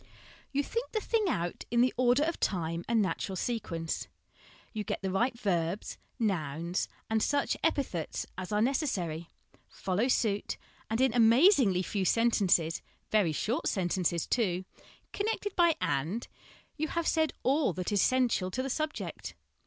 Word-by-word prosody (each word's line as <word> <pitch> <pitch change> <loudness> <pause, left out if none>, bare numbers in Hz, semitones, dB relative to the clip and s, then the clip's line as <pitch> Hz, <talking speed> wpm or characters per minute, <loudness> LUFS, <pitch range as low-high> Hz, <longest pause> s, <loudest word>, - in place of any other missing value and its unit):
You 285 +1 +1
think 465 - -4
the 435 - +1
thing 440 0 0
out 175 - -2
in 235 0 +3
the 255 - +3
order 250 +3 +3
of 335 +2 -1
time 170 -2 -1
and 225 -2 +3
natural 190 +1 -2
sequence; 175 -7 -3 0.7
you 215 -2 -2
get 200 - -4
the 190 - -1
right 235 +6 +1
verbs, 180 -2 -1 0.2
nouns, 170 - -1 0.2
and 220 0 +1
such 285 +4 +1
epithets 270 - -1
as 185 +1 -6
are 210 +1 +2
necessary, 185 - -1 0.4
follow 195 +6 -1
suit, 215 -5 0 0.3
and 225 +1 0
in 260 -1 +4
amaz 245 - +6
ingly 185 -4 +1
few 200 -2 -1
sentences, 190 -7 +3 0.3
very 205 -7 +3
short 215 - -1
sentences 175 -3 0
too, 190 -6 0 0.5
con 410 - -1
nected 410 -3 -2
by 340 -2 +4
' - - -40 0.2
and/ 185 - -4 0.5
you 315 +1 -1
have 335 +1 -2
said 315 -1 +2
all 275 -1 +3
that 180 +3 -3
is 205 -2 +3
essential 245 -7 +2
to 255 +8 -2
the 270 - -2
subject. 310 +3 -4
220 Hz, 160 wpm, -30 LUFS, 180-265 Hz, 0.7 s, amaz